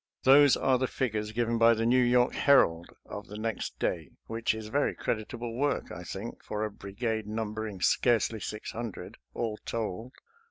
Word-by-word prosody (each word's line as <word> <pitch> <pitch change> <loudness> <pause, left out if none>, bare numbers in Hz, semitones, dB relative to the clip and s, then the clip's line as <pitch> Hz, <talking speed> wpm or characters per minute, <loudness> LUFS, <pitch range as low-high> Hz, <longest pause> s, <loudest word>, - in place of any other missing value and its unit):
Those 140 +1 +7
are 130 -1 +2
the 130 - +1
figures 110 -5 -2
given 115 0 0
by 115 0 +6
the 115 +1 -1
New 125 +2 +4
York 125 0 +3
Herald 85 -12 +4 0.2
of 105 0 -8
the 105 - -8
next 110 0 -3
day, 80 -5 -2 0.2
which 115 0 -1
is 110 -1 -7
very 145 +6 +1
creditable 115 +1 -3
work, 140 +3 -1
I - - -7
think, - - -7
for 105 0 -2
a 105 - -4
brigade 110 +2 -4
numbering 110 -2 -4
scarcely 115 0 +2
six 105 +1 -5
hundred, 115 -3 -6 0.2
all 110 -2 -2
told. 115 +2 -4
115 Hz, 170 wpm, -29 LUFS, 105-120 Hz, 0.2 s, Those